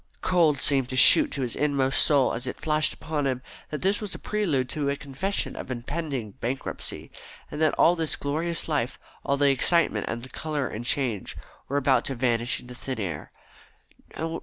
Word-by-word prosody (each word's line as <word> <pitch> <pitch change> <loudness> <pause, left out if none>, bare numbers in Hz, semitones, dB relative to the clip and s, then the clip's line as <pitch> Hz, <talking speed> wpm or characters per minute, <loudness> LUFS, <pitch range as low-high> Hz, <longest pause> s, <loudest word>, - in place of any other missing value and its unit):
Cold 165 -6 +3
seemed 135 -3 +3
to 130 - -4
shoot 130 - +8
to 140 - -2
his 120 - -2
inmost 140 -2 +2
soul 140 -4 +3
as 125 +3 -4
it - - -5
flashed 155 -1 +1
upon 150 -2 -3
him 130 -1 -2 0.3
that 150 +1 -5
this 200 +3 +2
was 210 -3 -5
a - - -5
prelude 165 -12 0
to 145 -1 -1
a 140 - 0
confession 145 +8 -3
of - - -7
impending 130 -2 -4
bankruptcy, 130 +3 -4 0.4
and 150 - -5
that 155 -2 +3
all 175 - +5
this 160 -2 -1
glorious 160 +4 -2
life, 130 -6 -1 0.3
all 140 - 0
the 140 0 +4
excitement 170 +6 +2
and 115 +1 -4
the 130 - -9
colour 150 -3 -3
and 115 +2 -6
change, 120 -7 -1 0.3
were 140 - -1
about 130 -3 +3
to 135 - -2
vanish 120 -1 0
into 125 0 -11
thin 130 0 -5
air. 85 -8 -5
140 Hz, 185 wpm, -26 LUFS, 125-155 Hz, 0.4 s, shoot